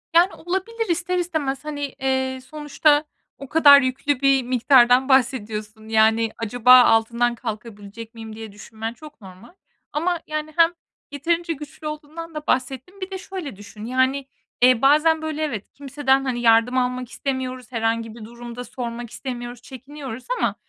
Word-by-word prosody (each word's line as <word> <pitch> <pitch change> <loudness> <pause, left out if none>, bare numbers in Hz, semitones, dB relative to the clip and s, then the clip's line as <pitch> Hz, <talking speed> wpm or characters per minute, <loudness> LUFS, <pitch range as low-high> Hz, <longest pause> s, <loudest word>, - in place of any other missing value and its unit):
Yani 350 +3 +5
olabilir 385 +6 -3
ister 350 +2 0
istemez 310 -6 -2
hani, 290 -1 -3 0.2
eee, 265 -1 -1
sonuçta 295 0 +1 0.3
o 275 - -10
kadar 285 -3 +8
yüklü 260 +1 -1
bir 275 -2 +4
miktardan 250 +1 +4
bahsediyorsun 220 -4 0
yani 220 0 +3
"Acaba 245 +3 +6
altından 235 +1 +2
kalkabilecek 220 -1 -8
miyim?" 225 -1 -9
diye 220 -1 -8
düşünmen 220 +2 -7
çok 300 -2 -14
normal. 190 - -14 0.4
Ama 340 +3 0
yani 305 0 -4
hem 335 0 +4 0.4
yeterince 335 +4 -1
güçlü 300 +1 -9
olduğundan 310 +2 -8
da 305 0 -6
bahsettin. 265 +9 -2
Bir 375 +1 -5
de 380 - -4
şöyle 365 - -7
düşün, 210 +1 -11
yani, 260 +3 +1 0.4
iii, 250 -1 +5
bazen 310 +3 +4
böyle, 315 0 -3
evet, 225 -10 -4
kimseden 275 -1 0
hani 245 -2 -2
yardım 230 +2 +4
almak 250 -1 -1
istemiyoruz, 255 -3 -4
herhangi 225 -1 -1
bir 225 -2 -10
durum 235 +1 -10
da 245 - -6
sormak 240 -1 -6
istemiyoruz, 245 -1 -7
çekiniyoruz 265 -1 -9
ama - - 0
260 Hz, 150 wpm, -22 LUFS, 230-300 Hz, 0.4 s, kadar